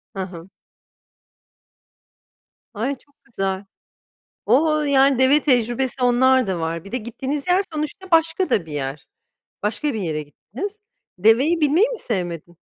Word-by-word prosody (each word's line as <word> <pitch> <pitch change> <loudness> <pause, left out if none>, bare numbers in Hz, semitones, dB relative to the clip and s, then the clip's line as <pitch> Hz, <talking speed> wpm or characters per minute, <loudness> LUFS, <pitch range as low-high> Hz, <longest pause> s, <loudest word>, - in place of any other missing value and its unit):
Hı 195 - -3
hı. 180 -1 -10 2.2
Ay, 235 +6 -2
çok 285 +2 -27
güzel. 195 -3 -3 0.8
O! 305 +7 +3
Yani, 275 -2 +3
deve 270 +3 +5
tecrübesi, 250 0 +1
onlar 255 0 +4
da 185 -3 -2
var. 165 0 -3
Bir 195 - -12
de 250 - 0
gittiğiniz 265 +6 -4
yer 365 +2 +3
sonuçta 310 +5 -4
başka 330 +3 +3
da 180 - +1
bir 160 - -11
yer. 140 0 -4 0.6
Başka 260 +7 -1
bir 220 - -3
yere 155 -5 -2
gittiniz. 285 - -8 0.4
Deveye 255 - +4
binmeyi 315 - +4
mi - - -5
sevmedin? 175 - -4
250 Hz, 135 wpm, -21 LUFS, 190-295 Hz, 2.2 s, deve